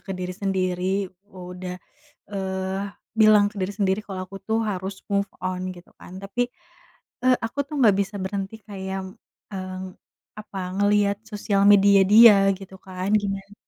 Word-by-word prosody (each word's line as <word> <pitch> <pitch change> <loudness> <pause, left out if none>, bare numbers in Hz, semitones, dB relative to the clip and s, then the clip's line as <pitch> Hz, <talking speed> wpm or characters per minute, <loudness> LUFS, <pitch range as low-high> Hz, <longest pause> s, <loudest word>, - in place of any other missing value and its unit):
ke 195 - -3
diri 180 0 -4
sendiri 190 0 -1 0.2
udah, 180 -1 -7 0.6
eee, 190 0 -3 0.4
bilang 215 -1 +7
ke - - -18
diri 190 +2 -2
sendiri 195 0 +1
kalau 190 -2 -5
aku 195 +1 -11
tuh 225 +1 +1
harus 195 -2 -3 0.2
move 200 0 +1 0.2
on 185 0 -2 0.2
gitu 175 - -15
kan - - -12
tapi 240 +5 -1 0.8
e - - +1 0.2
aku 225 - -11
tuh 305 - -7
nggak 210 -6 +5
bisa 200 +1 -3
berhenti 195 +1 -4
kayak, 190 -1 -4 0.5
eee, 185 -1 -5 0.6
apa 210 -2 -9 0.2
ngelihat 205 0 +2
sosial 205 -1 0
media 200 -1 +7
dia 225 -1 +10 0.2
gitu 190 -1 -12
kan 185 +1 -4
giman 195 0 -5
195 Hz, 150 wpm, -24 LUFS, 190-205 Hz, 0.8 s, dia